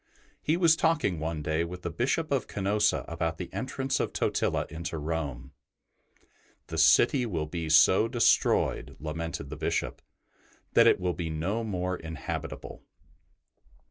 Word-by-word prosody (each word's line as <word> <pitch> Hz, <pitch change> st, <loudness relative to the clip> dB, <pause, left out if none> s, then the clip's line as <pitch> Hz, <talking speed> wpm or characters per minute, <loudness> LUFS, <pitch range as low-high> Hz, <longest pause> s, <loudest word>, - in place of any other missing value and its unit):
He 160 Hz, +3 st, +1 dB
was 170 Hz, -3 st, +5 dB
talking 150 Hz, -, +1 dB
one 80 Hz, -1 st, -3 dB
day 80 Hz, +2 st, 0 dB
with 90 Hz, +1 st, -7 dB
the 85 Hz, -, -3 dB
Bishop 140 Hz, -, -1 dB
of 135 Hz, -4 st, 0 dB
Canosa 105 Hz, +1 st, +1 dB
about 80 Hz, -1 st, -2 dB
the 90 Hz, -, -7 dB
entrance 135 Hz, +1 st, -2 dB
of -, -, -1 dB
Totila -, -, 0 dB
into 80 Hz, 0 st, -5 dB
Rome. 75 Hz, -5 st, -4 dB, 0.5 s
'' -, -, -36 dB
The 80 Hz, -, -3 dB
city 120 Hz, -, +5 dB
will 80 Hz, -7 st, -2 dB
be 80 Hz, +1 st, -4 dB
so 95 Hz, +7 st, +6 dB
destroyed,'' 120 Hz, 0 st, +2 dB
lamented 80 Hz, -2 st, -5 dB
the -, -, -6 dB
Bishop," -, -, -2 dB, 0.7 s
that -, -, +6 dB
it -, -, +5 dB
will 90 Hz, -1 st, -1 dB
be 85 Hz, -2 st, -4 dB
no 90 Hz, +9 st, -2 dB
more 90 Hz, -3 st, -2 dB
inhabitable." 80 Hz, 0 st, -6 dB
85 Hz, 145 wpm, -28 LUFS, 80-115 Hz, 0.7 s, so